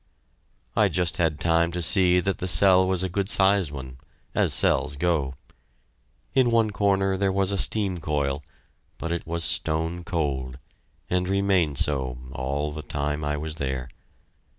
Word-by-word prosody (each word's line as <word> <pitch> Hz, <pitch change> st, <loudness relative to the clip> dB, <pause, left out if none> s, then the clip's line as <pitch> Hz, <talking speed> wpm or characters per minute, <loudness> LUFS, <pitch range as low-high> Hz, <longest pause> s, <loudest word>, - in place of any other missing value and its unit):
I -, -, +4 dB
just 90 Hz, -3 st, -1 dB
had 80 Hz, -3 st, 0 dB
time 85 Hz, 0 st, +2 dB
to 90 Hz, -, -3 dB
see 90 Hz, +1 st, +4 dB
that 95 Hz, 0 st, -2 dB
the 90 Hz, -, -3 dB
cell 95 Hz, +2 st, +5 dB
was 95 Hz, -1 st, +1 dB
a -, -, 0 dB
good 95 Hz, +2 st, -2 dB
sized 95 Hz, -4 st, +3 dB
one 65 Hz, -2 st, -9 dB, 0.3 s
as -, -, +2 dB
cells 75 Hz, -, +2 dB
go. 75 Hz, -4 st, 0 dB, 1.0 s
In 130 Hz, -2 st, +3 dB
one 115 Hz, -2 st, +2 dB
corner 95 Hz, -2 st, +1 dB
there 100 Hz, 0 st, +1 dB
was 95 Hz, 0 st, +1 dB
a 100 Hz, -, -1 dB
steam 95 Hz, -4 st, 0 dB
coil, 75 Hz, -3 st, -2 dB, 0.5 s
but 85 Hz, -, -5 dB
it 85 Hz, -1 st, -3 dB
was 85 Hz, 0 st, -2 dB
stone 80 Hz, +1 st, 0 dB
cold, 70 Hz, -7 st, -3 dB, 0.5 s
and 90 Hz, 0 st, 0 dB
remained 95 Hz, -7 st, +1 dB
so 65 Hz, -4 st, -1 dB
all 70 Hz, +3 st, -3 dB
the 75 Hz, +1 st, -6 dB
time 75 Hz, +1 st, -3 dB
I 75 Hz, 0 st, -1 dB
was 75 Hz, +1 st, -6 dB
there. 65 Hz, -3 st, -3 dB
85 Hz, 160 wpm, -25 LUFS, 75-95 Hz, 1.0 s, cell